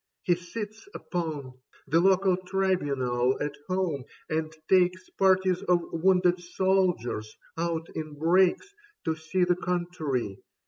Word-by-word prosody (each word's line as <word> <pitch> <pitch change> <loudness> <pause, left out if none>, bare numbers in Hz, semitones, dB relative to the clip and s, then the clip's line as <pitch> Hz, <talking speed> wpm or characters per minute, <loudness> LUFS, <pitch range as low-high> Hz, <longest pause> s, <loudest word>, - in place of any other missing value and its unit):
He 175 - +3
sits 210 - -7
upon 155 -7 -4 0.3
The 160 +4 +3
local 190 +1 +4
Tribunal 145 -10 0
at 145 0 -2
home, 180 -8 -1 0.3
and 155 0 -1 0.2
takes 185 0 +2
Parties 190 -1 +3
of 175 -1 +2
wounded 180 +1 +3
soldiers 180 - 0 0.2
out 165 -1 -2
in 155 -2 -5
brakes 180 - +3 0.3
To 160 -1 +1
see 160 +3 -1
the 180 0 +2
country. 160 - -2
175 Hz, 120 wpm, -28 LUFS, 155-185 Hz, 0.3 s, local